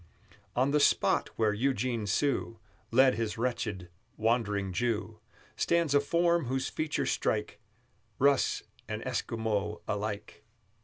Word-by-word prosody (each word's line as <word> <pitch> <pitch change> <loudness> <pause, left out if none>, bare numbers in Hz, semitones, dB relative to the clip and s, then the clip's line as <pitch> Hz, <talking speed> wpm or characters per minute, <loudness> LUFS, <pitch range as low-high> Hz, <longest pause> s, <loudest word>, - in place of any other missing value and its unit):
On 130 +3 +2
the 150 - +3
spot 145 - +3
where 110 -2 +2
Eugene 120 -1 0
Sue 120 +1 0 0.3
Led 130 +2 +5
his 110 0 -2
wretched 110 -6 -2 0.3
Wandering 105 -4 0
Jew, 110 0 -1 0.4
Stands 170 -4 +1
a 145 - +6
form 170 +2 +2
whose 130 +2 -1
features 155 -1 -1
strike 105 -1 -1 0.6
Russ 140 -1 +3 0.2
and 110 +1 -5
Esquimaux 110 -4 -2
alike. 105 0 -4
115 Hz, 115 wpm, -30 LUFS, 105-135 Hz, 0.6 s, a